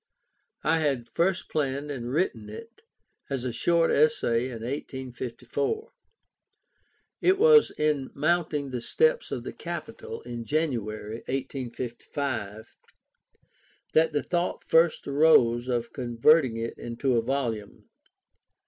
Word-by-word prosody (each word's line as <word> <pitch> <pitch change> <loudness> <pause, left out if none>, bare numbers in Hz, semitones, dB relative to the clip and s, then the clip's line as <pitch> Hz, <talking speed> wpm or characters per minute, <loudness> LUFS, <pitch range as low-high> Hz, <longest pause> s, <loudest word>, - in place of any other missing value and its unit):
I 165 - +3
had 135 -6 -1
first 180 +2 +1
planned 140 0 -2
and 125 -3 -5
written 130 - -1
it 230 - -11 0.5
as 135 -3 -2
a 125 -2 -2
short 170 +5 +2
essay 140 -6 +3
in 115 -3 -7
1854. 130 - -4 1.3
It 375 +1 +4
was 460 +1 +7
in 150 -3 0
mounting 150 -2 0
the 125 -2 -3
steps 470 - +2
of - - -3
the - - -6
Capitol, 455 0 -7
in 120 -1 -6
January, 115 -7 -2
1855, 125 -3 -4 1.2
that 160 +1 +4
the 145 -2 -1
thought 175 0 -1
first 165 0 +3
arose 130 -5 +4
of 120 -2 -2
converting 125 +1 +3
it 115 0 -4
into 120 +2 -1
a 115 - +3
volume. 115 -5 -3
135 Hz, 115 wpm, -27 LUFS, 120-160 Hz, 1.3 s, was